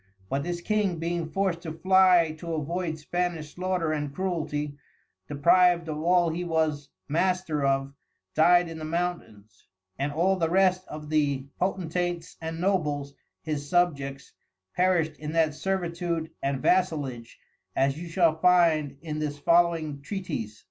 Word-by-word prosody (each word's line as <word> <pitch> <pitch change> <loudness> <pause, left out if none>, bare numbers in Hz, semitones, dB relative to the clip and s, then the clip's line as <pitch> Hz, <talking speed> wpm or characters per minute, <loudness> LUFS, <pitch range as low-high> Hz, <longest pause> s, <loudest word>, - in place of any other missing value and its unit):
But 135 - 0
this 175 +3 -4
King 205 -2 0
being 170 0 -2
forced 190 -2 -1
to 165 -2 -6
fly 180 -1 +4
to 170 -1 -4
avoid 165 +2 -2
the - - -13
Spanish 160 0 -3
slaughter 180 -3 -1
and 145 -2 -2
Cruelty, 150 -4 -3 0.5
deprived 170 +4 +4
of 155 -1 -3
all 175 0 +3
he 175 +2 -3
was 160 -4 -1 0.2
Master 170 -1 0
of, 135 0 +1 0.4
died 175 +2 +5
in 165 -1 -7
the - - -7
Mountains; 155 - -4 0.3
and 140 +1 -1
all 180 +6 +2
the 165 -2 0
rest 185 0 +2
of 150 0 -8
the 140 -3 +1
Potentates 175 -2 -2
and 165 0 -5
Nobles, 150 -7 0 0.3
his 145 -2 -4
subjects, 140 -6 0 0.4
perished 180 -4 +1
in 150 +1 -5
that 160 -2 +2
servitude 170 -2 -2
and 135 -1 -2
Vassalage; 145 -10 0 0.4
as 135 +1 +2
you 175 - -6
shall 165 -2 +2
find 160 -5 +3
in 155 -2 -4
this 150 -1 -3
following 165 -2 +2
Treatise. 140 - -5
165 Hz, 145 wpm, -27 LUFS, 150-180 Hz, 0.5 s, died